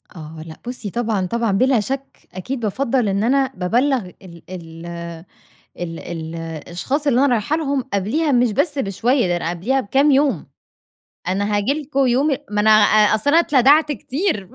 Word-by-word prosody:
آه 155 -1 -9
لأ، 160 - -9
بُصي 245 -4 -5
طبعًا، 220 -3 -1
طبعًا، 230 +3 -1
بلا 255 +5 +3
شك 270 +5 -6
أكيد 250 +8 -5
بافضَّل 240 +2 0
إن 200 +2 0
أنا 265 +2 +2
بابلَّغ 250 +9 +1 0.2
ال 170 -3 -13
ال 165 -2 -9 0.9
ال 165 -2 -5
ال 165 -1 -7
الأشخاص 170 - -4
اللي 260 -3 +3
أنا - - +4
رايحة 235 +7 0
لهم، 280 -4 -1
قبليها 235 - 0
مش 245 -3 +3
بس 285 - 0
بشوية 240 +2 +1
ده 175 - +1
أنا 170 -1 -2
قبليها 215 +11 0
بكام 270 +6 +2
يوم، 270 - +2 0.8
أنا 205 +3 0
هاجي 205 +6 +1
لكم 275 -1 0
يوم 255 +4 +2 0.2
ما 210 0 0
أنا 220 - +4
أ 215 0 +5
أصل 220 +7 +1
أنا 320 - +5
اتلدعت 295 +1 +4
كتير 275 - -2
230 Hz, 170 wpm, -20 LUFS, 185-270 Hz, 0.9 s, أ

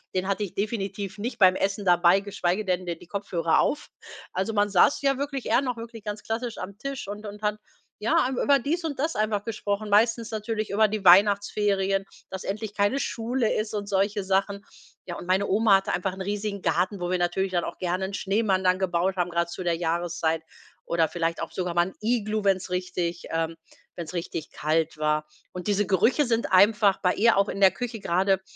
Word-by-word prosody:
den 185 +1 0
hatte 200 +1 0
ich 195 - -6
definitiv 200 -2 -3
nicht 230 +3 -5
beim 185 -1 +6
Essen 200 +1 -1
dabei, 175 +2 +5
geschweige 195 0 -1
denn 185 -1 -1
d 170 -1 -3
die 170 - -16
Kopfhörer 175 -5 0
auf. 300 - 0 0.4
Also 195 +4 -2
man 205 0 +2
saß 195 +10 +4
ja 275 -1 +2
wirklich 275 -2 -4
eher 235 +4 +3
noch 250 -3 -2
wirklich 230 -2 -9
ganz 210 0 -5
klassisch 230 +1 -3
am 200 +2 -7
Tisch 275 -4 -5
und 210 +1 -7
und 205 +1 -9
hat, 210 0 0 0.4
ja, 220 +2 +1
am 260 -1 -3
über 280 -1 +4
dies 330 +7 -2
und 290 -4 -4
das 315 +3 -1
einfach 210 -1 0
gesprochen. 210 -1 -3
Meistens 225 +2 +3
natürlich 215 0 -3
über 215 +2 +3
die 210 -3 -4
Weihnachtsferien, 195 0 +4 0.3
dass 190 - -6
endlich 205 +1 -4
keine 205 +7 +1
Schule 235 -1 -1
ist 215 0 -2
und 205 -1 -3
solche 200 +1 0
Sachen. 195 +1 0 0.4
Ja, 175 -2 -6
und 175 - -9
meine 190 +2 +2
Oma 205 0 +5
hatte 195 - -3
einfach 185 +1 -1
'n 190 - -8
riesigen 205 0 -3
Garten, 180 +4 0
wo 175 0 -3
wir 185 - +1
natürlich 185 +2 0
dann 175 - +1
auch - - -6
gerne 185 +1 -1
'n 195 - -6
Schneemann 195 -1 0
dann 185 +1 +3
gebaut 185 0 0
haben, 180 -1 0
grad 170 0 -1
zu 175 +2 -6
der 170 -1 +1
Jahreszeit 165 -1 -1 0.4
oder 165 -1 +1
vielleicht 165 -1 -2
auch - - -5
sogar 180 -2 -2
mal 175 +1 +2
'n - - -9
Iglu, 215 -2 0
wenn's 190 -2 +1
richtig 180 -1 -3
ähm, 165 0 -1 0.4
wenn's 170 0 -6
richtig 165 -2 -5
kalt 155 0 -1
war. 150 0 0 0.3
Und 180 +2 -6
diese 205 0 +2
Gerüche 225 - +3
sind 230 -3 0
einfach 200 +1 +5
bei 180 -2 +2
ihr 230 -1 +4
auch 200 +1 +3
in 200 - -5
der 190 -2 +7
Küche 230 +1 -5
grade, 190 +2 +1
195 Hz, 210 wpm, -26 LUFS, 180-215 Hz, 0.4 s, der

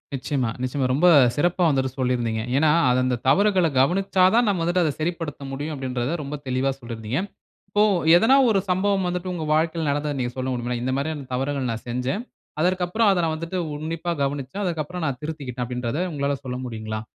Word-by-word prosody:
நிச்சயமா, 130 -2 -1
நிச்சயமா. 130 +1 -1
ரொம்ப 170 +6 +4 0.3
சிறப்பா 175 +4 +1
வந்துட்டு 130 -3 0
சொல்லியிருந்தீங்க. 120 -3 0 0.2
ஏன்னா, 150 0 +4 0.2
அது 125 +1 +3
அந்த 125 -1 +1
தவறுகள 190 +1 +4
கவனிச்சா 185 +5 +2
தான் 240 0 +4
நம்ம 190 -5 +1
வந்துட்டு 175 +1 +2
அத 155 - +1
சரிப்படுத்த 160 -3 -3
முடியும் 145 +3 -4
அப்பிடின்றத 130 +2 -2
ரொம்ப 145 +2 -5
தெளிவா 130 +2 +1
சொல்லியிருந்தீங்க. 115 +1 -4 0.5
இப்போ 205 +1 +3 0.3
எதனா 225 +9 +5
ஒரு 200 -3 +3
சம்பவம் 190 +1 +1
வந்துட்டு 180 +1 -3
உங்க 165 -3 -4
வாழ்க்கையில 160 0 +1
நடந்தத 145 0 -1
நீங்க 120 -1 -1
சொல்ல 130 - -2
முடியுமா? 120 0 -3
"இந்த 130 - -1
மாதிரியான 145 -1 -3
தவறுகள் 135 0 -1
நான் 115 - -6
செஞ்சேன். 125 - -2 0.4
அதற்கு 180 +1 +1
அப்பறம் 220 +3 +2
அத 180 -2 +2
நான் 160 -1 -1
வந்துட்டு 165 +3 -4 0.2
உன்னிப்பாக 165 +2 -3
கவனிச்சேன். 140 +7 -3
அதற்கு 165 -4 -1
அப்பறம் 180 +1 -5
நான் 130 -3 -3
திருத்திக்கிட்டேன்" 135 -6 -4
அப்பிடின்றத 125 +5 -3
உங்களால 140 -1 -1
சொல்ல 125 0 -3
முடியுங்களா? 110 -2 -5
145 Hz, 180 wpm, -23 LUFS, 130-175 Hz, 0.5 s, எதனா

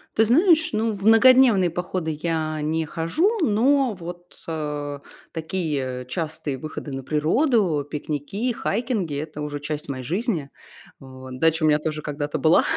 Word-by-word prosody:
Ты 220 - +5
знаешь, 315 - +4
ну, 220 +1 0
в 195 -1 -8
многодневные 225 -3 +6
походы 170 -2 -3
я 155 -2 -1
не 160 +2 -1
хожу, 310 - 0
но 255 +3 +3
вот, 175 -1 -10
э, 150 -3 -4 0.3
такие 150 -7 -3
частые 155 -5 -3
выходы 150 0 -7
на 135 0 -5
природу, 160 - +1
пикники, 155 - -3
хайкинги- 215 - -2
это 155 0 -6
уже 145 -1 -4
часть 150 0 -5
моей 130 -2 -5
жизни. 180 - -1 0.5
Вот 130 -1 -10
дача 160 +1 +2
у 155 - +5
меня 150 0 +4
тоже 155 0 -3
когда-то 145 0 -3
была, 160 +1 +5
160 Hz, 145 wpm, -23 LUFS, 150-215 Hz, 0.5 s, многодневные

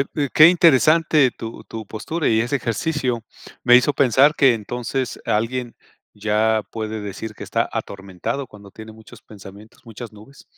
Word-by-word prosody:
e 145 - 0
eh, - - -3
qué 155 +2 +8
interesante 160 -4 +4
tu 115 0 -9
tu 110 -2 -8
postura 150 +11 -4
y 110 0 +2
ese 130 +5 -1
ejercicio 125 0 -2 0.4
me 125 0 +6
hizo 145 +4 +3
pensar 140 +3 +3
que 135 -5 +4
entonces 120 +4 -4
alguien 120 +3 -2 0.4
ya 110 +1 0
puede 110 -1 -5
decir 105 +2 -7
que - - -9
está - - -1
atormentado 100 +7 -5
cuando 100 -2 -15
tiene 110 0 -11
muchos 110 0 -16
pensamientos, 100 +1 -15
muchas 115 0 -10
nubes. 110 +6 -16
115 Hz, 160 wpm, -20 LUFS, 110-135 Hz, 0.4 s, qué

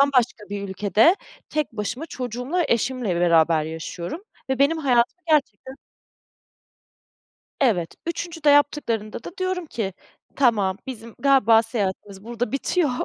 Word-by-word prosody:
bambaşka 250 -7 +2
bir 200 -1 -5
ülkede 210 - +3 0.3
tek 305 -5 -2
başıma 230 +8 -4
çocuğumla, 255 +8 -2
eşimle 235 -5 0
beraber 165 -2 +4
yaşıyorum 170 - -6 0.3
ve 265 - 0
benim 305 +4 +3
hayatımı 260 +4 +1
gerçekten 265 -4 0 1.9
Evet, 190 -11 +1
üçüncüde 335 -2 0
yaptıklarında 235 -7 +1
da 350 - -9
diyorum 370 -2 -2
ki, 210 -8 -3 0.4
tamam, 205 -8 +2
bizim 230 -3 -8
galiba 245 -5 +5
seyahatimiz 200 -3 -4
burada 240 +1 -3
bitiyor, 295 +2 +1
240 Hz, 115 wpm, -23 LUFS, 205-290 Hz, 1.9 s, galiba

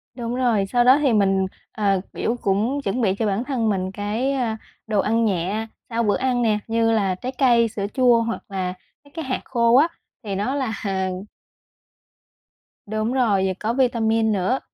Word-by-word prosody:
Đúng 240 -1 -4
rồi. 235 -6 +2
Sau 240 +5 +2
đó 255 +3 +6
thì 275 -5 +3
mình, 195 -2 +3 0.3
à, 200 -2 +1 0.2
kiểu, 235 +2 -1
cũng 220 +9 0
chuẩn 240 +4 -1
bị 195 -4 +2
cho 220 - -1
bản 205 +2 0
thân 255 -5 -1
mình 190 -2 -1
cái, 210 +7 -2
a, 240 -5 -1 0.3
đồ 215 -2 +1
ăn 225 +3 +2
nhẹ 200 +3 -1 0.2
sau 235 0 0
bữa 205 -2 +2
ăn 255 -2 0
nè, 215 -3 +2
như 225 0 +2
là 200 -4 +1
trái 250 +8 -5
cây, 240 -4 +4
sữa 210 -2 -4
chua 245 -3 +4
hoặc 230 0 -3
là 185 -2 -2 0.3
mấy 285 - -21
cái 325 -1 -5
hạt 255 -1 -2
khô 235 -2 +2
á, 290 +5 +6 0.4
thì 200 -3 -4
nó 210 +8 -1
là 265 -5 -1 2.1
Đúng 215 +3 -2
rồi, 215 -7 +2
vừa 190 - 0
có 220 +2 -1
vitamin 225 -3 +2
nữa. 205 +6 0
225 Hz, 185 wpm, -22 LUFS, 205-245 Hz, 2.1 s, đó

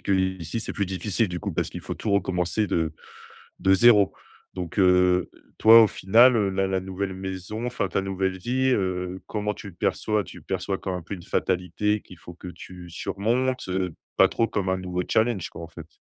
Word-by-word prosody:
qu'ici 95 0 -1
c'est - - -5
plus 100 -2 -1
difficile 95 +3 -1
du 85 -1 -5
coup, - - -4
parce - - -2
qu'il - - -7
faut - - -5
tout 105 - -4
recommencer 95 +1 0
de 80 -4 0 0.7
de 95 0 +4
0. 105 -1 +6 0.4
Donc, 90 +2 -6
heu, 90 -1 +4 0.3
toi, 115 +1 +9
au - - +6
final, 115 +6 +5
heu, 100 -3 +2
la 95 0 0
la 95 -1 0
nouvelle 95 0 -4
maison 95 +4 -5
enfin 125 0 -2
ta - - 0
nouvelle 95 -1 -2
vie, 130 +6 0
heu, 95 -4 -1
comment 105 -1 -2
tu 105 -2 -9
le 90 - -12
perçois? 105 +4 0
Tu - - -12
perçois 95 +1 -3
comme 95 - -4
un 90 - -4
peu 100 - -6
une 90 - -10
fatalité 95 +4 0
qu'il 90 - -15
faut 85 - -11
que 90 - -10
tu 90 0 -11
surmontes? 120 +7 -1
Heu, 90 -2 -2 0.2
pas - - +6
trop 115 - 0
comme 100 -4 -2
un 95 - +1
nouveau 90 -1 -3
challenge 110 -5 +1
quoi, 85 - -9
en 80 - -8
fait? 80 -1 -11
95 Hz, 205 wpm, -25 LUFS, 90-105 Hz, 0.7 s, toi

